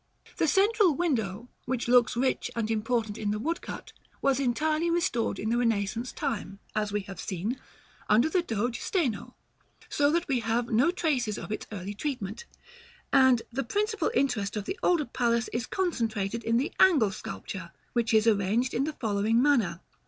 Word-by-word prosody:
The 325 - +2
central 395 -1 +4
window, 240 - -1 0.2
which 250 -2 -2
looks 240 -2 +4
rich 260 +1 0
and 225 -1 -1
important 220 -1 -1
in 210 - -1
the 210 - 0
woodcut, 330 +10 -4 0.3
was 275 -1 +2
entirely 305 +6 +1
restored 335 -9 0
in 220 - -3
the 240 - +2
Renaissance 230 +1 0
time, 200 -3 -3 0.2
as 210 -1 0
we 205 0 0
have 195 0 -10
seen, 205 +8 -3 0.5
under 225 +7 +5
the 350 +3 +2
Doge 235 -5 -2
Steno; 275 - -1 0.5
so 285 0 +2
that 340 +3 0
we 265 -4 +1
have 230 +1 -1
no 240 +8 +4
traces 275 - 0
of - - -7
its 215 - -4
early 200 -1 -5
treatment; 235 - -4 0.7
and 260 -4 +5
the 270 +3 -2
principal 425 - 0
interest 220 -7 0
of 205 - -3
the 380 - -4
older 335 -5 +2
palace 235 -1 0
is 235 +1 -2
concentrated 230 - -1
in 230 +1 +2
the 265 - -1
angle 280 - +5
sculpture, 185 -2 -7 0.2
which 235 -2 +1
is 220 -1 +4
arranged 220 +4 +2
in 270 - +1
the 310 - -3
following 220 -1 +1
manner. 235 -11 +2
235 Hz, 170 wpm, -28 LUFS, 215-285 Hz, 0.7 s, under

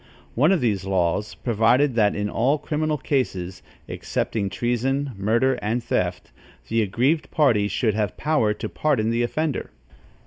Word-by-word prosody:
One 150 +9 +3
of 190 - +2
these 105 -6 0
laws 95 +1 -1
provided 120 +4 +2
that 105 -3 +2
in 105 0 -1
all 130 +8 +1
criminal 155 +1 -1
cases, 95 -11 -2 0.3
excepting 100 -3 -2
treason, 130 +6 -1
murder 115 +6 +1
and 115 +3 -1
theft, - - -2 0.4
the 115 - +2
aggrieved 130 - 0
party 115 -9 +3
should 110 +1 0
have 105 -2 -2
power 150 -9 +1
to - - -5
pardon 130 -8 0
the 115 +1 0
offender. 150 +5 -2
120 Hz, 145 wpm, -23 LUFS, 105-140 Hz, 0.4 s, One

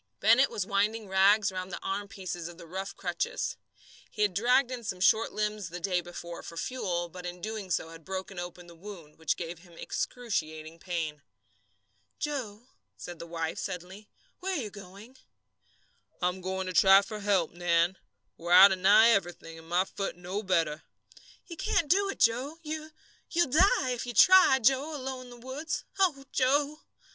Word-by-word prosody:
Bennett 235 +6 +5
was 195 - -3
winding 210 +2 0
rags 195 +2 +4
round 185 0 -5
the - - -5
armpieces 195 -4 -4
of 170 - -12
the 170 - -11
rough 190 +4 -6
crutches. 475 +2 -2 0.5
He 210 - -1
had 205 -3 +1
dragged 245 +6 +3
in 245 -2 -5
some 185 -4 -4
short 220 +4 +3
limbs 210 -3 -2
the 175 +2 -6
day 180 0 0
before 170 0 -8
for 170 - -10
fuel, 175 -7 -2
but 180 +1 -10
in 175 0 -5
so - - -18
doing 215 -2 -5
had 165 0 -3
broken 190 +1 -6
open 175 0 -7
the 170 - -14
wound, 170 -4 -12
which 160 - 0
gave 170 -1 -6
him 175 0 -18
excruciating 160 -9 -4
pain. 160 -4 -4 1.0
"Joe," 245 -8 -4 0.3
said 175 -2 -8
his 170 - -9
wife, 165 -1 -3
suddenly, 190 +2 -7 0.3
"where 380 +1 -2
are 275 - -2
you 210 - -7
going?" 200 +5 -13 1.0
"I'm 180 +1 -1
going 190 +1 -3
to 185 - -4
try 195 +2 +7
for 210 +1 -7
help, 200 -5 +1
Nan. 175 +1 +1 0.4
We're 170 +1 -1
out 190 +2 +10
of 190 - -1
nigh 205 +5 +7
everything, 175 -5 -2
and 160 0 -15
my 180 +2 +2
foot 195 0 -4
no 180 +4 -4
better." 165 -6 0 0.6
"You 335 - -9
can't 330 - 0
do 395 +2 +3
it, - - -4
Joe. 255 +7 +1
You 310 0 -5 0.4
you'll 345 -6 +1
die, 320 - +4
if 245 0 -4
you 240 - -5
try, 370 - +7
Joe, 270 +5 +2
alone 260 -2 -5
in - - -13
the 245 - -12
woods. 295 +5 -4 0.2
Oh, 300 -8 +2
Joe!" 285 +3 +1
195 Hz, 180 wpm, -29 LUFS, 175-245 Hz, 1.0 s, out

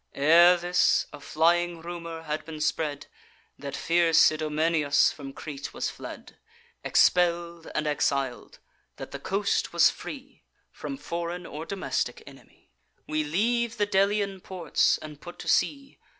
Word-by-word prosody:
Ere 170 +5 +6
this, 175 +1 +2
a - - -9
flying 170 +2 +1
rumour 170 -1 -7
had 155 -1 -3
been 155 0 -8
spread 150 -1 -1 0.5
That 140 -1 -6
fierce 165 -2 +4
Idomeneus 155 -1 +2
from 140 -2 -9
Crete 140 0 -8
was - - -2
fled, - - -10 0.4
Expell'd 170 -1 +2
and 150 - 0
exil'd; 140 -3 -1 0.4
that - - -9
the - - -6
coast 200 +1 -1
was - - +5
free - - -10 0.3
From 275 - -6
foreign 170 -6 -5
or 155 +1 -7
domestic 170 -10 -3
enemy. - - -17 0.4
"We 155 0 0
leave 230 +9 0
the 205 - +2
Delian 200 -1 +1
ports, 185 -3 +1
and 150 -2 -11
put 175 0 -10
to - - -9
sea. 275 -1 0
170 Hz, 135 wpm, -27 LUFS, 155-180 Hz, 0.5 s, Ere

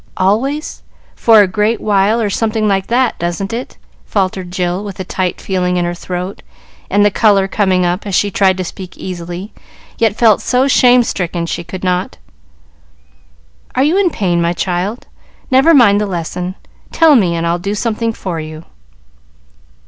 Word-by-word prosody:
"Always 245 - -1 0.3
for 225 -2 +5
a - - +1
great 210 +4 0
while 205 +2 +2
or 210 -3 -1
something 220 0 0
like 195 -1 0
that; 245 0 +1
doesn't 175 +5 -3
it?" 240 +3 -6 0.3
faltered 190 -2 -2
Jill, 180 +1 -2
with 200 -3 -8
a - - -2
tight 185 -1 -3
feeling 180 -2 -1
in 175 - 0
her 175 - -2
throat, 180 +2 -6 0.5
and 205 +2 +3
the 205 - +3
color 200 -1 +3
coming 190 -2 +1
up, 180 +4 -2
as 195 - -1
she 205 +1 +1
tried 190 -1 +2
to 185 - -2
speak 185 +1 -9
easily, 175 +2 -7 0.5
yet 225 -3 +2
felt 220 -3 +4
so 250 +3 +1
shame 250 -2 +5
stricken 175 -5 -3
she 170 +1 -4
could 180 +2 -8
not. 180 0 -1 1.6
"Are 260 - +3
you 305 +5 +2
in 390 -2 +3
pain, 180 - 0
my 170 +1 +1
child? 185 +6 -3 0.5
Never 265 +5 +5
mind 220 -9 +5
the 210 - -1
lesson; 180 0 -4 0.4
tell 320 -3 +5
me, 180 -8 +2
and 165 0 -2
I'll 170 +1 0
do 200 +3 -3
something 230 +1 -1
for 185 -6 -5
you." 155 +1 -8
195 Hz, 170 wpm, -15 LUFS, 180-225 Hz, 1.6 s, for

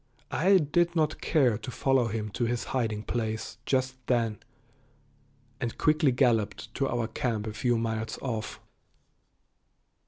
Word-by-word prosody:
I 190 +5 +5
did 170 +2 +1
not 155 -1 +1
care 125 -9 +3
to 115 - -7
follow 130 -1 +2
him 110 -1 -3
to 120 - -1
his 120 0 -1
hiding 110 -5 -1
place 110 -2 -3
just 130 -1 +1
then, 115 -4 +1 1.2
and 115 - -3
quickly 155 -2 +3
galloped 120 -2 +1
to 135 - 0
our 120 -1 -1
camp 110 -1 -2
a 110 - -4
few 120 +1 +1
miles 110 -1 -2
off. 110 -5 -4
120 Hz, 135 wpm, -28 LUFS, 110-135 Hz, 1.2 s, I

